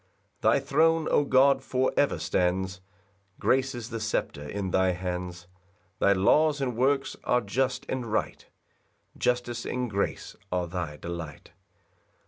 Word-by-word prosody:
5 - - +4
Thy - - +3
throne, 160 +2 +2
O - - +4
God, 135 0 +4
for 130 -1 0
ever 145 -10 +2
stands, 90 +3 -1 0.6
Grace 130 0 +1
is 120 0 -7
the 115 - -3
sceptre 110 -9 -2
in 100 0 -3
thy 95 0 +3
hands; 90 -1 -5 0.5
Thy 100 - +4
laws 145 +11 +3
and 130 -4 -1
works 135 +3 +1
are 125 - +3
just 125 +4 -1
and 130 -2 -3
right, 110 - -2 0.7
Justice 120 -1 -1
and 125 0 -2
grace 100 0 -2 0.2
are 90 -1 0
thy 85 -3 -4
delight. 85 -3 -7
115 Hz, 140 wpm, -27 LUFS, 90-130 Hz, 0.7 s, 5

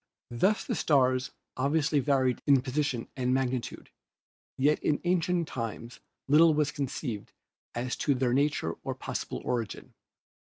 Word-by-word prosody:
Thus 190 - +2
the - - -2
stars 130 -2 +2 0.3
obviously 145 +2 +1
vary 130 -2 +2
in 135 -3 +5
position 135 -3 -1
and 130 -1 +1
mag 130 -2 +1
nitude, 125 -2 -5 0.7
yet 145 +3 +3
in 150 - +1
ancient 175 -1 +1
times 115 0 -6 0.3
little 155 +3 +6
was 150 -1 +1
conceived 130 -6 -4 0.4
as 125 +1 -2
to 140 - +1
their 125 -1 +1
nature 140 - +1
or - - -3
possible - - -5
origin. 115 -3 -3
135 Hz, 140 wpm, -29 LUFS, 125-150 Hz, 0.7 s, little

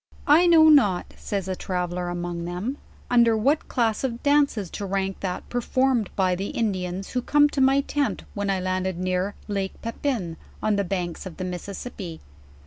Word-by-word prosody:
I 320 +5 +6
know 325 -2 +7
not/ 240 - +4
says 195 -2 -4
a 190 - -2
traveller 180 -1 -3
among 175 -1 -4
them, 185 +11 -4 0.3
"under 235 -2 +5
what 280 +8 +1
.class 225 -2 0
of 240 -3 -3
dances 285 - +2
to - - -5
rank 195 0 -2
that 185 -2 -4
performed 245 -2 +1
by 185 -2 +2
the 190 +3 -3
Indians 190 -4 -2
who 250 - 0
came 295 +4 +4
to 280 - -1
my 270 +1 +5
tent 285 0 -1
when 205 -1 -2
I 195 -1 +1
landed 185 0 -1
near 185 +2 -1
lake 195 -2 -3
Pepin, 230 - -2 0.2
on 215 -1 +1
the 200 - +1
banks 180 -1 -3
of 170 - -10
the 185 - -3
Mississippi. 180 -1 -6
200 Hz, 175 wpm, -25 LUFS, 185-250 Hz, 0.3 s, know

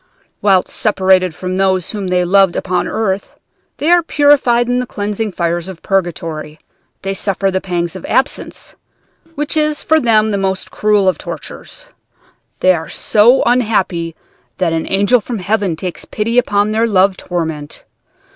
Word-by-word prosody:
"'Whilst 195 -3 +3
separated 190 -4 +1
from 185 0 -4
those 190 -2 +1
whom 205 -3 -4
they 180 0 +1
loved 195 0 +4
upon 180 -1 -1
earth, 200 -3 -2 0.4
they 310 +4 +1
are 350 0 +6
purified 285 -7 +3
in 245 0 +1
the 250 - -3
cleansing 210 +1 -3
fires 170 -1 -2
of 185 -3 -10
purgatory, 165 -5 -2 0.5
they 195 0 -2
suffer 195 0 -1
the 190 0 -1
pangs 175 -2 -3
of 185 - -8
absence, 270 +2 -2 0.6
which 295 +2 -2
is 305 -1 0
for 315 0 +3
them 220 -4 +3
the 200 - -1
most 190 0 -2
cruel 210 -2 +2
of 185 - +1
tortures. - - -8 0.8
They 185 - +5
are 165 -2 -5
so 230 +5 +3
unhappy 195 -9 0 0.4
that 175 -3 0
an 160 0 -2
angel 205 +5 +3
from 235 +2 -5
heaven 200 -2 -1
takes 180 +1 -6
pity 230 +3 0
upon 205 -3 +1
their 225 +2 +1
love 195 -2 +3
torment. 160 -5 -5
195 Hz, 155 wpm, -16 LUFS, 180-225 Hz, 0.8 s, are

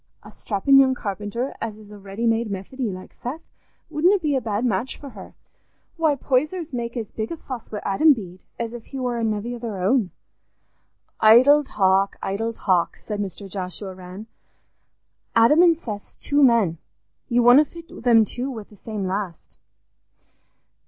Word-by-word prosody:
A - - -12
strappin' 255 +7 +3
young 260 -1 +4
carpenter 210 +4 -4
as 220 -2 -4
is 210 -1 -14
a 205 - -11
ready 200 +4 -5
made 225 0 +1
Methody, 210 +6 -4
like 185 0 -10
Seth, 290 +7 -6 0.4
wouldna 340 +6 +3
be 305 -6 -1
a 265 - +1
bad 220 +1 -2
match 235 +3 -1
for 280 - -10
her. - - -12 0.6
Why, 320 -3 +2
Poysers 300 +5 -1
make 235 0 -4
as 225 -3 -5
big 220 0 -4
a 335 - -4
fuss 255 -6 -8
wi' 210 - -4
Adam 295 +11 +4
Bede 185 -7 -9 0.2
as 230 0 -3
if 240 -2 -9
he 270 - -7
war 245 -2 -1
a - - -2
nevvy 220 +2 -2
o' - - -9
their 225 -4 -5
own." 195 +2 +1 1.1
"Idle 255 +7 +7
talk! 195 -3 +2
idle 225 +4 -2
talk!" 185 -6 0
said 210 -1 -6
Mr. 200 0 -5
Joshua 190 0 -6
Rann. 185 +3 -10 1.1
"Adam 230 +8 +6
an' 345 -2 +6
Seth's 215 -10 -8
two 290 0 0
men; 225 - +4 0.5
you 240 0 +3
wunna 245 +5 +8
fit 335 +2 -12
them 230 -3 +5
two 250 +6 -4
wi' 230 -5 -6
the 210 - -19
same 210 -1 -5
last." 185 -2 -5
230 Hz, 170 wpm, -23 LUFS, 200-265 Hz, 1.1 s, wunna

